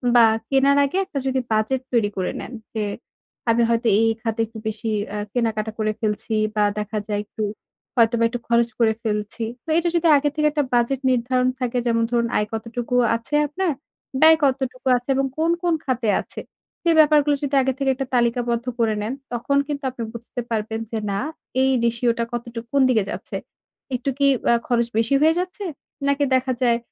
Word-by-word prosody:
বা 235 Hz, -1 st, +8 dB, 0.2 s
কেনার 275 Hz, +1 st, +4 dB
আগে 280 Hz, -, -2 dB
একটা 280 Hz, -, -4 dB
যদি 265 Hz, 0 st, +1 dB
বাজেট 220 Hz, +5 st, +1 dB
তৈরি 225 Hz, -3 st, +3 dB
করে 185 Hz, -, -1 dB
নেন, -, -, -8 dB, 0.2 s
যে 215 Hz, -, 0 dB, 0.7 s
আমি 230 Hz, +1 st, +4 dB
হয়তো 230 Hz, 0 st, +1 dB
এই, -, -, +3 dB
এই -, -, 0 dB
খাতে 225 Hz, -1 st, -3 dB
একটু 225 Hz, 0 st, -12 dB
বেশি 220 Hz, +1 st, -3 dB, 0.2 s
অ্যা 210 Hz, -, -4 dB
কেনাকাটা 220 Hz, -3 st, -1 dB
করে 215 Hz, 0 st, +1 dB
ফেলছি 220 Hz, +1 st, -1 dB, 0.2 s
বা 210 Hz, -, +3 dB, 0.2 s
দেখা 210 Hz, +1 st, -3 dB
যায় 205 Hz, -1 st, -1 dB
একটু 215 Hz, +1 st, -5 dB, 0.5 s
হয়তোবা 230 Hz, -1 st, +3 dB
একটু 245 Hz, -, -4 dB
খরচ 235 Hz, 0 st, +3 dB
করে 220 Hz, -1 st, +4 dB
ফেলছি। 210 Hz, +1 st, -2 dB, 0.2 s
তো -, -, -11 dB
এইটা 340 Hz, +1 st, +2 dB
যদি 340 Hz, 0 st, +3 dB
আগের 290 Hz, 0 st, +1 dB
থেকে 300 Hz, 0 st, +2 dB
একটা 295 Hz, -1 st, +1 dB
বাজেট 245 Hz, +2 st, +2 dB
নির্ধারণ 250 Hz, +1 st, +1 dB
থাকে 250 Hz, -1 st, -1 dB
যেমন 230 Hz, 0 st, +2 dB
ধরুন 235 Hz, -1 st, +2 dB
আয় 210 Hz, -, 0 dB
কতটুকু 230 Hz, +2 st, -3 dB, 0.2 s
আছে 230 Hz, +6 st, -3 dB
আপনার, 355 Hz, +4 st, -1 dB, 0.5 s
ব্যয় 320 Hz, 0 st, +8 dB
কতটুকু 265 Hz, -1 st, -1 dB
আছে 245 Hz, +2 st, -10 dB
এবং 270 Hz, +1 st, +1 dB
কোন, 325 Hz, +1 st, +2 dB
কোন 345 Hz, -1 st, +2 dB
খাতে 250 Hz, -4 st, 0 dB
আছে? -, -, -9 dB, 0.4 s
সে 340 Hz, -, +2 dB
ব্যাপারগুলো 295 Hz, -1 st, +5 dB
যদি 280 Hz, 0 st, 0 dB
আগে 265 Hz, 0 st, 0 dB
থেকে 275 Hz, -1 st, 0 dB
একটা 270 Hz, 0 st, -4 dB
তালিকাবদ্ধ 240 Hz, 0 st, +1 dB
করে 220 Hz, -2 st, +2 dB
নেন, 215 Hz, +4 st, -2 dB, 0.2 s
তখন 240 Hz, +4 st, 0 dB
কিন্তু 285 Hz, -1 st, -4 dB
আপনি 240 Hz, -2 st, -6 dB
বুঝতে 235 Hz, +1 st, -6 dB
পারবেন 220 Hz, 0 st, -2 dB
যে 225 Hz, -, -2 dB
না, 195 Hz, -, -1 dB, 0.4 s
এই 265 Hz, -, +4 dB
রেশিও 235 Hz, +1 st, +2 dB
টা 235 Hz, -, +2 dB
কতটুক, 235 Hz, -1 st, -5 dB
কোন 280 Hz, -, +4 dB
দিকে 225 Hz, -5 st, +3 dB
যাচ্ছে? -, -, -5 dB, 0.6 s
একটু 250 Hz, +2 st, -2 dB
কি 280 Hz, -, +4 dB, 0.2 s
অ্যা 235 Hz, -, +5 dB
খরচ 235 Hz, -1 st, +2 dB
বেশি 230 Hz, +4 st, +2 dB
হয়ে 315 Hz, +1 st, +5 dB
যাচ্ছে? 365 Hz, +3 st, -4 dB, 0.4 s
নাকি 280 Hz, +1 st, +2 dB
দেখা 260 Hz, 0 st, +1 dB
যায় 235 Hz, -2 st, +3 dB
240 Hz, 190 wpm, -22 LUFS, 225-275 Hz, 0.7 s, বা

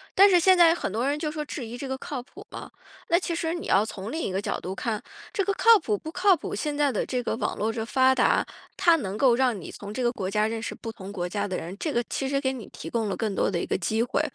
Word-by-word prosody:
但 400 Hz, +2 st, +8 dB
是 360 Hz, -2 st, +6 dB
现 370 Hz, +2 st, +5 dB
在 335 Hz, -2 st, +7 dB
很 270 Hz, -, -3 dB
多 230 Hz, +6 st, -1 dB
人 285 Hz, +1 st, 0 dB
就 305 Hz, -1 st, -2 dB
说 305 Hz, 0 st, -3 dB
质 275 Hz, -3 st, -5 dB
疑 230 Hz, +2 st, -7 dB
这 270 Hz, +2 st, -5 dB
个 265 Hz, -, -3 dB
靠 265 Hz, -1 st, -5 dB
谱 -, -, -14 dB
吗？ -, -, -8 dB, 0.4 s
那 340 Hz, -, +5 dB
其 355 Hz, -, -3 dB
实 330 Hz, 0 st, -1 dB
你 345 Hz, -, -5 dB
要 200 Hz, +3 st, +4 dB
从 205 Hz, 0 st, -6 dB
另 320 Hz, -, -3 dB
一 -, -, -2 dB
个 190 Hz, +1 st, -1 dB
角 -, -, -2 dB
度 185 Hz, +2 st, -5 dB
看， 220 Hz, 0 st, -2 dB, 0.3 s
这 395 Hz, -, +1 dB
个 400 Hz, -, +1 dB
靠 455 Hz, +1 st, +6 dB
谱 215 Hz, -, -1 dB
不 315 Hz, -, -8 dB
靠 370 Hz, +2 st, +4 dB
谱， -, -, -6 dB
现 295 Hz, -2 st, -2 dB
在 290 Hz, -2 st, +3 dB
的 215 Hz, -, -1 dB
这 250 Hz, -1 st, -2 dB
个 -, -, -1 dB
网 -, -, -2 dB
络 220 Hz, +2 st, 0 dB
这 225 Hz, 0 st, -3 dB
发 260 Hz, +2 st, +4 dB
达， -, -, +3 dB, 0.3 s
它 340 Hz, -2 st, +5 dB
能 200 Hz, -8 st, -4 dB
够 255 Hz, -2 st, +5 dB
让 245 Hz, -4 st, +1 dB
你 170 Hz, -, -8 dB
从 205 Hz, 0 st, -8 dB
这 255 Hz, -, -2 dB
个 240 Hz, -, +3 dB
国 195 Hz, -6 st, -4 dB
家 210 Hz, +2 st, +1 dB
认 225 Hz, 0 st, -3 dB
识 -, -, -5 dB
不 225 Hz, -, -7 dB
同 195 Hz, -2 st, -9 dB
国 180 Hz, -3 st, -3 dB
家 205 Hz, +2 st, -2 dB
的 185 Hz, -2 st, -3 dB
人， 175 Hz, +3 st, -6 dB
这 315 Hz, -, -2 dB
个 240 Hz, -, +1 dB
其 270 Hz, -, -2 dB
实 275 Hz, 0 st, +1 dB
给 265 Hz, -2 st, 0 dB
你 245 Hz, -5 st, -8 dB
提 -, -, -8 dB
供 225 Hz, -2 st, -1 dB
了 195 Hz, -, -1 dB
更 215 Hz, -3 st, -1 dB
多 -, -, +1 dB
的 175 Hz, -, -1 dB
一 -, -, -2 dB
个 -, -, -1 dB
机 220 Hz, +5 st, 0 dB
会， 245 Hz, -, 0 dB
245 Hz, 330 characters per minute, -26 LUFS, 210-300 Hz, 0.4 s, 但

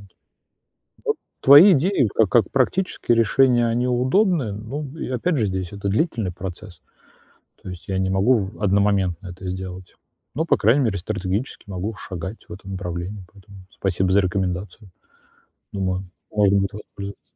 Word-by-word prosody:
Вот 100 Hz, -, -16 dB, 1.3 s
твои 150 Hz, +9 st, +9 dB
идеи 155 Hz, -, +2 dB
ка 110 Hz, -, +4 dB
как 100 Hz, 0 st, +2 dB
практические 135 Hz, -2 st, +1 dB
решения, 120 Hz, +1 st, +4 dB
они 120 Hz, +2 st, 0 dB
удобные, 130 Hz, -, +2 dB
ну 115 Hz, +9 st, -5 dB
и -, -, -4 dB
опять 145 Hz, +5 st, 0 dB
же, 110 Hz, -, +1 dB
здесь 95 Hz, -1 st, -4 dB
это 100 Hz, 0 st, -4 dB
длительный 110 Hz, -, 0 dB
процесс. 90 Hz, 0 st, -9 dB, 0.8 s
То -, -, -9 dB
есть 90 Hz, +1 st, -10 dB
я 95 Hz, -, -1 dB
не 95 Hz, 0 st, 0 dB
могу 100 Hz, +7 st, +3 dB
в 100 Hz, 0 st, -4 dB
одномоментно 100 Hz, -3 st, +1 dB
это 90 Hz, +1 st, -9 dB
сделать. 95 Hz, 0 st, -7 dB, 0.4 s
Но, 160 Hz, +3 st, 0 dB
по -, -, +3 dB
крайней 120 Hz, +7 st, +3 dB
мере, 100 Hz, -3 st, 0 dB
стратегически 100 Hz, +4 st, -4 dB
могу 95 Hz, +4 st, -4 dB
шагать 95 Hz, +4 st, -7 dB
в -, -, -7 dB
этом 95 Hz, -1 st, -10 dB
направлении. 90 Hz, +1 st, -5 dB
Поэтому 100 Hz, 0 st, -16 dB
спасибо 95 Hz, -1 st, -1 dB
за 100 Hz, -, +5 dB
рекомендацию. 95 Hz, +2 st, -3 dB, 0.8 s
Думаю 95 Hz, -1 st, -2 dB, 0.3 s
можно 100 Hz, -1 st, +4 dB
будет 100 Hz, 0 st, -1 dB
воспользоваться. 100 Hz, -1 st, -9 dB
100 Hz, 150 wpm, -22 LUFS, 95-120 Hz, 1.3 s, твои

